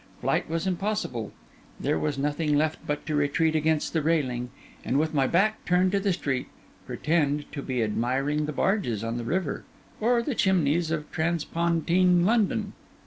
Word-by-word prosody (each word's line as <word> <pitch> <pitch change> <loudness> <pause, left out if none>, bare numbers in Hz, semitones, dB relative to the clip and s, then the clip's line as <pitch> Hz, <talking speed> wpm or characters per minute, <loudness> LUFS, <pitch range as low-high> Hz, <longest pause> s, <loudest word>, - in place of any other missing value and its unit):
Flight - - 0
was 165 +1 -1
impossible. 185 - -2 0.5
There 80 - 0
was 145 -2 -1
nothing 150 +1 0
left 155 +1 0
but 150 0 -2
to 155 - -3
retreat 150 +2 +1
against 155 0 +1
the 160 - +1
railing, 130 -6 0 0.3
and 130 - 0
with 155 +2 +1
my 135 -3 +2
back 215 +5 +1
turned 180 +1 +2
to 200 - +2
the 195 0 +1
street, 135 -7 -2 0.4
pretend 150 -2 0
to 145 - -5
be 130 -4 -1
admiring 135 +7 0
the - - -2
barges 150 - 0
on 115 +1 -2
the 120 - -3
river 160 +5 -2 0.4
or 235 +1 +2
the 280 - -2
chimneys 170 -6 +2
of 155 -2 -3
transpontine 170 +2 +2
London. 220 0 +1
155 Hz, 165 wpm, -26 LUFS, 140-180 Hz, 0.5 s, my